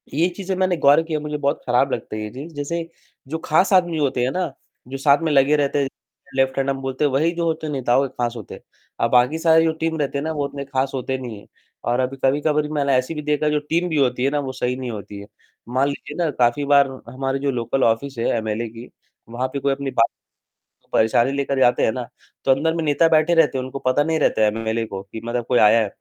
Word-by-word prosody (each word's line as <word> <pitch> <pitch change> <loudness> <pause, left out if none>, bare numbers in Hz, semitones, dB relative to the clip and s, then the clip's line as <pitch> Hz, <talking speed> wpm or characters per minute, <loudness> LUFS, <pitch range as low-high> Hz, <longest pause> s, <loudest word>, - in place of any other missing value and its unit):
ये 160 +5 +2
चीज़ें 195 -1 -3
मैंने 185 -2 +1
गौर 145 +1 +5
किया, 160 -2 -2
मुझे 150 0 -4
बहुत 140 +1 -1
खराब 125 +2 +2
लगता - - -4
है 110 - -4
ये 105 - -4
चीज़, 145 +7 -9
जैसे 165 +4 -3 0.4
जो 160 +4 -3
खास 175 +5 +3
आदमी 175 -3 +3
होते 135 -4 0
हैं 125 - +1
ना, 180 -3 -2 0.3
जो 135 +2 -5
साथ 140 +2 +4
में 160 - +1
लगे 140 +1 +4
रहते 145 -1 +1
हैं, 135 - 0 0.5
लेफ्ट 135 0 +1
हैंड 135 0 0
हम 135 -1 -2
बोलते 135 +2 -1
हैं, 145 - +1
वही 155 +6 +2
जो 170 0 -1
होते 160 -1 -2
हैं 150 - -3
नेताओं 135 0 +2
के 130 - -18
खास 120 0 -1
होते 110 -4 -9
हैं, - - -14 0.4
और 115 - +2
बाकी 125 +5 +3
सारी 160 0 +4
जो 160 - +2
टीम 160 0 0
रहती 140 -1 -1
है 140 - -2
ना, 160 - -2
वो 145 -2 -2
उतने 140 0 -6
खास 135 0 -1
होते 130 0 -2
नहीं 120 -5 -7
हैं। - - -18 0.4
और 120 - +1
अभी 130 +1 -1
कभी-कबार 150 +2 +2
मैंने 140 -2 +1
ऐसा 130 +5 0
भी 150 - -4
देखा 150 0 0
कि - - -1
जो 150 - +2
टीम 170 +2 +1
भी 160 - -1
होती 125 -3 +1
है 135 - +3
ना, 145 - 0
वो 135 -2 -3
सही 125 -1 -1
नहीं 130 -2 -5
होती 105 -1 -8
है। 100 - -10 0.4
मान 130 +3 +1
लीजिए 145 +1 -7
ना, 165 - +1
काफ़ी 125 +2 +1
बार 140 -1 +5 0.2
हमारी 135 +2 -2
जो 140 0 0
लोकल 125 +2 -1
ऑफिस 125 +4 0
है 115 - -1
एमएलए 110 +1 -2
की, 115 +2 -11 0.4
वहाँ 125 +3 -2
पे 140 - -2
कोई 140 +1 0
अपनी 135 0 -4
बात, 115 -2 +3 0.9
परेशानी 115 +4 +3
लेकर 140 -1 -1
जाते 120 - +4
हैं - - +2
ना, 125 0 -5 0.4
तो - - +2
अंदर 150 +5 +2
में 165 - -1
नेता 155 +2 +3
बैठे 160 +1 +3
रहते 160 -5 +3
हैं, 130 - -2
उनको 130 +1 -6
पता 130 +2 +2
नहीं 160 0 0
रहता 110 -7 +2
एमएलए 110 +1 -1
को 95 -2 -6
कि 100 +3 -9
मतलब 120 0 -2
कोई 125 - +3
आया 110 +2 +6
है। - - -1
135 Hz, 260 wpm, -21 LUFS, 125-150 Hz, 0.9 s, आया